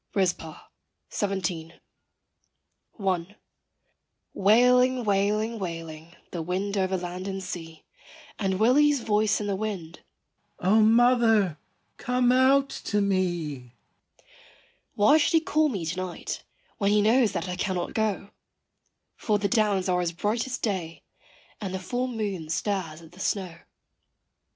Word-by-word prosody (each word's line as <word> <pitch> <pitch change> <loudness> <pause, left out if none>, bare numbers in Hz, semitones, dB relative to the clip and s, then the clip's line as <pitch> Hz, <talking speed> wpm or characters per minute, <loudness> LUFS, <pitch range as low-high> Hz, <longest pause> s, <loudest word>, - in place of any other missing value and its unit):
JEAN 200 - +3
INGELOW. - - +5
RIZPAH. 165 -3 -4 0.4
17. 180 -5 -3 1.3
I. 185 +1 -1 1.0
Wailing, 250 +5 +4
wailing, 210 +2 0
wailing, 165 -2 -7 0.2
the 170 - -4
wind 190 +4 -2
over 190 -1 0
land 180 +1 -6
and 195 -1 -4
sea 165 -3 -8 0.5
And 190 -2 0
Willy's 280 +4 +4
voice 210 -1 +1
in 210 - -3
the 200 -1 -1
wind, 190 -6 -5 0.6
"O 205 +5 +3
mother, 225 -6 +4 0.4
come 250 0 +1
out 270 +2 +4 0.2
to 205 - +1
me." 175 -10 -1 1.2
Why 215 +10 +5
should 310 - +1
he 325 - +6
call 310 -1 +1
me 195 -10 -3
to 165 +3 -3
night, 185 -1 -5 0.4
when 200 -2 +2
he 210 0 +3
knows 225 -1 +3
that 190 - -3
I 180 - -3
cannot 185 -2 -2
go? 210 -3 -1 0.9
For 210 -2 +1
the 200 0 0
downs 205 -4 +1
are 180 -1 +1
as 175 -1 -1
bright 215 +8 -1
as 255 - -3
day, 180 -7 -3 0.6
and 190 -2 -4
the - - -3
full 245 +7 -2
moon 205 -9 -4
stares 165 -2 -2
at 160 - -15
the 180 - -17
snow. 190 -3 -2
200 Hz, 135 wpm, -26 LUFS, 180-220 Hz, 1.3 s, he